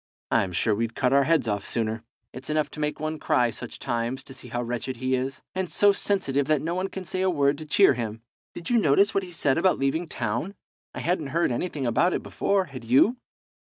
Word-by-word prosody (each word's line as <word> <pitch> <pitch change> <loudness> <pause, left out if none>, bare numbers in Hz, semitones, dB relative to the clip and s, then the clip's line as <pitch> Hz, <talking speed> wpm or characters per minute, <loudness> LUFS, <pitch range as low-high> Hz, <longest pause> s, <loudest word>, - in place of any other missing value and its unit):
I'm 95 - +2
sure 105 +5 +1
we'd 115 +2 -2
cut 125 -1 +1
our 140 0 +5
heads 155 -5 +2
off 100 -2 -1
sooner. 110 -1 -2 0.3
It's 130 +3 -9
enough 155 0 0
to - - -9
make 150 0 -2
one 155 0 -3
cry, 120 -1 +2
such 125 +1 -8
times, 120 0 -2
to 135 - -12
see 130 - -11
how 120 +1 -3
wretched 120 +1 -4
he 130 +2 -1
is, 130 +1 -2
and 185 -1 -3
so 205 0 +5
sensitive 145 -9 0
that 155 -2 +3
no 165 +2 -1
one 185 +2 -1
can 190 -1 -7
say 185 +3 -2
a 190 - +2
word 145 -4 +2
to 155 - -8
cheer 195 +1 +5
him. 115 -2 -5 0.3
Did 170 +7 -6
you 240 - +5
notice 195 +5 +4
what 195 - +2
he 185 -2 -9
said 150 -3 +1
about 185 +1 +3
leaving 150 +6 0
town? 120 - -3 0.4
I - - -4
hadn't 170 -4 0
heard 165 +2 +1
anything 145 +1 -2
about 165 +10 +2
it - - -3
before, 195 -2 0
had 135 -6 -9
you?" 135 - +4
140 Hz, 230 wpm, -26 LUFS, 120-175 Hz, 0.4 s, our